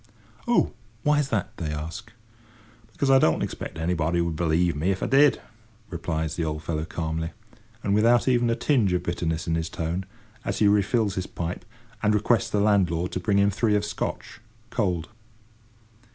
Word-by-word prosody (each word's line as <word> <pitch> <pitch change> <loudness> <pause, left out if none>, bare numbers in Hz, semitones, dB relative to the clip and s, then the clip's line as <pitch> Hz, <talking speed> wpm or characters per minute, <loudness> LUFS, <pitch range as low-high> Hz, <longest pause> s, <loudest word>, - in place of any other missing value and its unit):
"Oh! 240 - +3 0.3
why's 150 -2 +2
that?" 105 -5 -2
they 75 -3 -3
ask. 80 +10 -6 0.8
"Because 135 -1 +1
I 135 - +7
don't 80 -10 +2
expect - - -5
anybody 85 0 0
would 85 -1 0
believe 85 0 +1
me 80 +6 0
if 95 -1 -1
I - - +1
did," 140 +1 +5 0.5
replies 80 -2 -2
the 85 - -1
old 75 0 -3
fellow 80 -2 -2
calmly, 80 0 -3 0.5
and 100 - +1
without 115 +4 +4
even 120 -2 +3
a 115 - +2
tinge 115 -9 +2
of 90 -1 0
bitterness 85 -2 -2
in 80 - -1
his 80 0 -1
tone, 85 +4 -3 0.4
as - - -2
he 105 - +4
refills 105 +1 +2
his 95 0 -3
pipe, 85 +1 -5 0.4
and 105 0 +3
requests 105 +1 +2
the 105 - 0
landlord 90 -4 +2
to - - -2
bring 100 +2 +1
him 100 0 +4
three 105 +2 +1
of 105 0 +1
Scotch, 105 - -5 0.3
cold. 90 -7 -1
90 Hz, 175 wpm, -25 LUFS, 80-105 Hz, 0.8 s, I